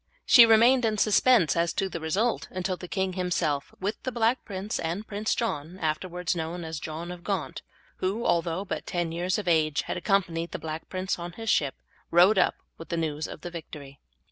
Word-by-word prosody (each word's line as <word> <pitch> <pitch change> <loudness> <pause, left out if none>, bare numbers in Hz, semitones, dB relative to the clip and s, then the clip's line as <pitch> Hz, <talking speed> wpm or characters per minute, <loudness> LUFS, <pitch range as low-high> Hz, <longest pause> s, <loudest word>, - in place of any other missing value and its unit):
She 235 -3 +9
remained 235 +3 +6
in 220 -2 +1
suspense 210 - +4
as 170 0 +1
to 195 - 0
the 170 - -5
result 195 +9 0
until 185 0 -2
the 180 - -9
king 190 0 -1
himself 175 -6 -1
with 205 +3 -3
the 255 - -3
Black 235 +1 +1
Prince 200 +1 -4
and 170 +6 -3
Prince 210 +1 -1
John, 175 -6 -3
afterwards 180 +2 -2
known 170 +1 -4
as 160 -1 -5
John 160 +4 -6
of 175 -1 -9
Gaunt, 195 -5 -3 0.4
who, 205 +6 -2
although 170 +3 0
but - - -5
ten 175 -2 -1
years 175 +2 -1
of 205 -3 -5
age, 155 -4 +2
had - - -4
accompanied 175 -3 0
the - - -2
Black 160 0 -6
Prince 185 -1 -2
in 175 0 -6
his 225 +2 -2
ship, 140 -3 +1 0.3
rode 185 +4 +5
up - - +3 0.2
with 165 - -10
the 170 - -1
news 155 -2 -2
of - - -9
the 175 - -6
victory. 145 -4 -9
180 Hz, 200 wpm, -27 LUFS, 165-200 Hz, 0.4 s, She